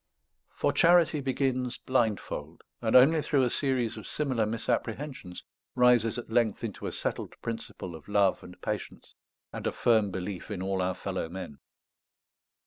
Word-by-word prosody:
For - - +1
charity 170 -3 +5
begins 130 -2 -1
blindfold; 115 -6 -1 0.2
and 110 -2 +1
only 150 +5 +7
through 140 -2 +2
a 125 - +1
series 130 -5 0
of 110 - -8
similar 130 -8 0
misapprehensions 115 -2 -3 0.3
rises 125 -2 +4
at 120 - -7
length 115 -3 +1
into - - -4
a - - -3
settled - - -3
principle 115 -5 -5
of 80 -2 -11
love 100 -2 +2
and 90 - -12
patience, - - -5 0.4
and - - -3
a - - +1
firm 110 -4 +3
belief 95 +1 -5
in 95 -3 -4
all 95 -1 -1
our 90 0 0
fellow 80 - -4
men. 90 -5 -7
115 Hz, 150 wpm, -29 LUFS, 95-130 Hz, 0.4 s, only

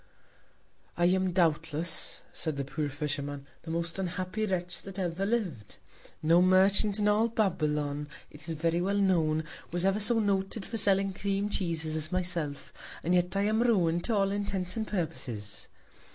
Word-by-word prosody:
I 175 - +3
am, 185 +1 +2
doubtless, 165 -1 +1
said 155 -4 -1
the 140 - -2
poor 145 +2 -3
Fisherman, 145 0 -3 0.2
the 165 - -10
most 170 +2 -2
unhappy 185 +3 -2
Wretch 180 -2 -3
that 195 0 -8
ever 185 +1 -1
liv'd! 180 - -2 0.5
No 165 +3 +5
Merchant 195 +3 +4
in 210 -1 +1
all 210 +2 +3
Babylon, 150 -9 -1 0.2
it 150 +2 -13
is 165 - -2
very 165 +2 0
well 200 +2 0
known, 165 -6 +2 0.3
was 175 +2 -1
ever 195 +2 +2
so 220 +3 +5
noted 200 -1 0
for 225 - -3
selling 195 -1 +3
Cream 200 +1 -1
Cheeses 165 -5 -1
as 155 0 -2
myself; 175 -6 -2 0.3
and 175 - +1
yet 180 +2 +2
I 200 - +2
am 215 +2 +2
ruin'd 175 -8 +2
to 230 - +1
all 195 -1 +2
Intents 200 -3 -2
and 220 -1 -2
Purposes. 120 - -4
180 Hz, 165 wpm, -29 LUFS, 160-200 Hz, 0.5 s, No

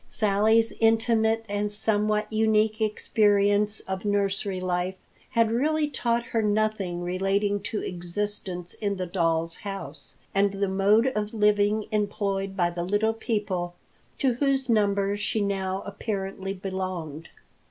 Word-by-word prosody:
Sally's 220 +2 +3
intimate 225 0 +2
and 205 0 -1
somewhat 210 0 +1
unique 215 0 +2
experience 205 -1 +2
of 190 0 -5
nursery 200 -1 0
life 180 0 -1 0.3
had 230 -1 +2
really 300 +6 +1
taught 235 -4 0
her 230 -1 -1
nothing 210 -4 0
relating 195 +3 0
to 210 +1 -3
existence 180 0 -4
in 205 -2 -2
the 185 -1 -3
doll's 165 -2 0
house, 160 -8 -8 0.2
and 200 0 +2
the 200 0 0
mode 200 +4 +3
of 210 +1 -2
living 210 0 +2
employed 200 -2 -1
by 175 -1 +2
the 175 0 -3
little 205 +4 +1
people 200 -6 -2 0.4
to 265 -3 +2
whose 270 +1 +1
number 200 -2 +2
she 205 +1 -1
now 195 -1 -1
apparently 195 -2 -4
belonged. 185 -5 -5
205 Hz, 130 wpm, -26 LUFS, 190-215 Hz, 0.4 s, Sally's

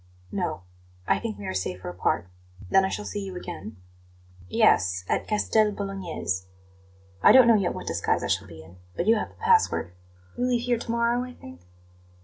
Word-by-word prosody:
"No; 170 - -3 0.4
I - - +3
think 105 0 -4
we 100 - -8
are 95 - -3
safer 95 0 -4
apart. 90 0 -1 0.4
Then 195 - +5
I 190 - 0
shall 210 - -4
see 205 - -4
you 190 -1 -7
again?" 105 - -7 0.7
"Yes; 90 +1 +3
at - - -1
Castel 215 0 +2
Bolognese. 180 - -4 0.7
I - - +8
don't 260 -2 +8
know 230 - +7
yet 195 -5 +1
what - - -7
disguise - - 0
I - - -1
shall 95 +2 0
be 80 -3 -11
in, 85 +3 -16 0.2
but 170 - -1
you 225 - +6
have - - -3
the - - -21
password. 450 - +2 0.5
You 250 - +1
leave 240 -1 +1
here 240 -2 +1
to 235 - -8
morrow, 235 +1 +1
I 250 0 -8
think?" 85 - -13
185 Hz, 190 wpm, -26 LUFS, -, 0.7 s, I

